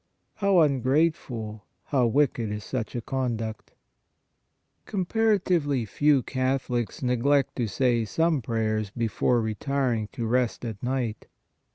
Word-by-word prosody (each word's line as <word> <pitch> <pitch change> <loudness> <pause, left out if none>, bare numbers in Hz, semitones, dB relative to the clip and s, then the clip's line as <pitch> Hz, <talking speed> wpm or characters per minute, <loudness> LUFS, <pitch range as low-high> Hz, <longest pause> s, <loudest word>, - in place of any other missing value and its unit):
How 200 -4 +4
un 140 -4 +3
grateful! 125 -7 0 0.2
How 130 -4 +2
wicked 125 -3 +1
is 105 0 -4
such 125 -3 -4
a 120 - -2
conduct! 115 -5 -3 0.6
" - - -49
Comparatively 185 - +1
few 145 +4 +2
Catholics 130 -2 -1
neglect 130 +3 +2
to 120 -3 0
say 120 +2 +1
some 160 +5 +1
prayers 110 -2 -1
before 115 +2 +1
retiring 115 +1 -1
to 120 -4 -3
rest 125 +1 0
at 110 -4 -6
night. 125 -4 -2
125 Hz, 125 wpm, -26 LUFS, 115-140 Hz, 0.6 s, How